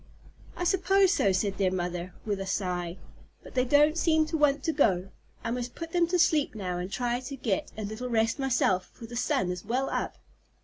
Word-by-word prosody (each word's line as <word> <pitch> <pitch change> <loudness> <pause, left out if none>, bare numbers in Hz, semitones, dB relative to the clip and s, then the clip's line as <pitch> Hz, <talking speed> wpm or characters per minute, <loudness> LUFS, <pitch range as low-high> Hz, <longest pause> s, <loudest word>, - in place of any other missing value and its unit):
"I - - -2
suppose 385 +1 +3
so," 200 - +3
said 195 +1 -1
their 190 -2 +3
mother, 180 -1 -3
with 205 -2 -1
a 195 - -4
sigh, 180 -2 -2 0.5
"but - - -12
they 255 -1 +2
don't 295 +4 +4
seem 315 -2 +3
to 320 - -3
want 290 -2 +2
to 320 - 0
go. 190 - +2 0.3
I - - -2
must 245 0 -4
put 330 -1 -6
them 345 -1 +3
to 360 +1 +1
sleep 315 -7 +3
now 180 -4 -3
and 180 +2 -5
try 245 +1 -1
to 260 +2 -7
get 220 -7 -2
a 215 - -4
little 215 +5 -5
rest 225 +2 +1
myself, 235 -8 +1
for 235 - -10
the 240 +1 -9
sun 190 -6 0
is 180 -1 -5
well 255 +5 -1
up." - - -2
240 Hz, 215 wpm, -28 LUFS, 190-300 Hz, 0.5 s, don't